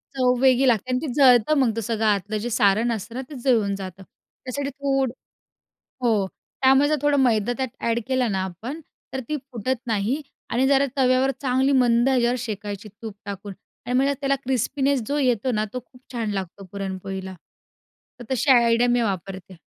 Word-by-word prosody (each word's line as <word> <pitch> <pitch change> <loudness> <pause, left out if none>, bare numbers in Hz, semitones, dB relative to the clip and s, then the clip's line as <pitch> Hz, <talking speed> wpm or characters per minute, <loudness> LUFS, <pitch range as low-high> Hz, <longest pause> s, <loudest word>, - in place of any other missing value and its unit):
चव 250 -1 +3
वेगळी 265 0 +4
लागते 245 +1 +1
आणि 250 - +1
ते 315 - -3
जळतं 255 -1 +5
मग 255 -4 +3
ते 230 - -2
सगळं 220 +1 -1
आतलं 210 0 +1
जे 225 +3 -3
सारण 215 +1 +2
असतं 230 +1 -5
ना, 260 - -3
तेच 270 -5 -9
जळून 220 -7 +2
जातं. 190 -1 -8
त्यासाठी 275 +8 -7
थोड 270 -2 -1 0.9
हो, 220 -5 +2 0.4
त्यामुळे 270 +2 +5
जर 305 - +2
थोडं 290 0 +3
मैदा 230 -2 +2
त्यात 260 -1 -2
ॲड 230 0 0
केलं 255 -4 +1
ना 190 -1 0
आपण, 225 - -6 0.3
तर 265 - -3
ती 305 - -1 0.2
फुटत 245 +2 -2
नाही 225 +6 0 0.3
आणि 255 +3 +2
जरा 280 0 +4
तव्यावर 260 +1 +3
चांगली 265 +1 +2
मंद 240 +1 +3
ह्याच्यावर 250 -2 +2
शेकायची 210 -3 -5
तूप 220 -3 -6
टाकून 200 0 -6 0.3
आणि 245 - -2
म्हणजे 275 +2 +2
त्याला 275 0 +1
क्रिस्पीनेस 265 +1 0
जो 290 - -1
येतो 255 -2 +1
ना, 215 -1 0
तो 250 - -4
खूप 250 0 -21
छान 230 -3 -2
लागतो 195 0 -5
पुरणपोळीला. 190 -1 -5 0.9
तर - - -7
तशी 260 +3 +1
आयडिया 235 -1 +5
मी 245 0 +3
वापरते. 190 -2 -4
240 Hz, 180 wpm, -23 LUFS, 205-265 Hz, 0.9 s, जळतं